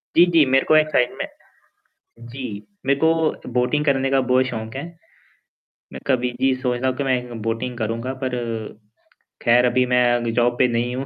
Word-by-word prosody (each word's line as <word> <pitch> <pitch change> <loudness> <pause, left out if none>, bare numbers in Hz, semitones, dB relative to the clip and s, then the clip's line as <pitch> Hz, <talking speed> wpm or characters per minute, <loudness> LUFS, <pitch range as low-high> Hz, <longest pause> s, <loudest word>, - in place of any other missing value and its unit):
जी, 170 - +7
जी। 165 -4 +4
मेरे 135 +1 +2
को 155 - +4
एक 155 0 +4
साइड 125 -4 +1
में - - -3 1.0
जी, 120 -5 -7 0.2
मेरे 140 0 +2
को 160 -4 +1
बोटिंग 125 +5 +1
करने 135 -2 +1
का 135 - +3
बहुत 130 0 +2
शौक 110 -2 -6
है, 140 - -4 1.1
मैं - - -8
कभी 125 -2 +1
जी, 135 0 +3
सोचता 125 0 0
हूँ 130 - -2
कि 140 - -2
मैं 130 -1 +2
एक 125 0 -11
बोटिंग 115 +2 -3
करूँगा 115 +3 -3
पर 130 -1 -2 1.1
खैर 120 +1 +4
अभी 125 +1 +2
मैं 125 0 +2
अग 120 -1 -1
जॉब 120 0 +2
पे 125 - +5
नहीं 120 +1 -1
हूँ, 135 +2 -4
125 Hz, 190 wpm, -21 LUFS, 120-135 Hz, 1.1 s, जी